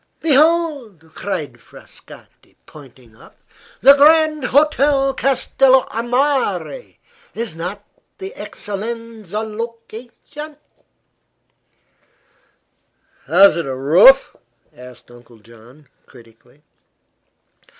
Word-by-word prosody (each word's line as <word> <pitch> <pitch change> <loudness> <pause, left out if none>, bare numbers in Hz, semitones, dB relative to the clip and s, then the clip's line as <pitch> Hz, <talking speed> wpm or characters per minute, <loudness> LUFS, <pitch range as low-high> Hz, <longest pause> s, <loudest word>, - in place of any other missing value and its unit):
"Behold!" 290 - 0
cried 175 -7 -6
Frascatti, - - -18
pointing 130 -6 -17
up, - - -20 0.4
"the 275 +2 +8
Grand 305 0 +3
Hotel 280 -1 +1
Castello 265 0 +1
a 225 - -3
Mare; 275 - -2 0.4
is 230 -6 -4
it - - -16
not 190 +5 -7 0.3
the 390 +3 -9
excellenza 220 - -7
location?" 230 +6 -10 2.7
"Has 195 -5 +5
it 170 - -4
a 130 - -4
roof?" 175 - +4 0.4
asked 125 -1 -15
Uncle 120 -1 -18
John, 115 +6 -20 0.2
critically. 120 +3 -21
230 Hz, 85 wpm, -18 LUFS, -, 2.7 s, the